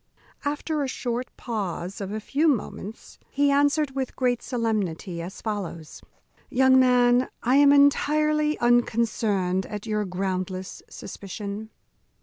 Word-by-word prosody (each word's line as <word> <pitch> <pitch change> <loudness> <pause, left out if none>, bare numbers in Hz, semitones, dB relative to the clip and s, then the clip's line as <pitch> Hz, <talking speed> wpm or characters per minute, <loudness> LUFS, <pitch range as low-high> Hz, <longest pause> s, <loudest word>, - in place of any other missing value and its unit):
After 295 +1 -2
a 275 - -1
short 245 -1 -3
pause 200 -3 -4
of 195 0 -4
a 215 - -3
few 285 +9 0
moments, 225 -5 -3
he 285 0 +2
answered, 285 +1 +2
with 265 -1 -4
great 245 -2 0
solemnity, 205 -8 -2
as 180 +4 -8
follows: 185 -7 -5 0.5
"Young 260 +1 +5
man, 250 0 +4
I 255 +3 +3
am 285 0 +7
entirely 300 +2 +3
unconcerned 220 -6 +1
at 210 0 -6
your 210 -1 -1
groundless 185 0 -4
suspicion. 200 +2 -7
235 Hz, 125 wpm, -25 LUFS, 195-275 Hz, 0.5 s, am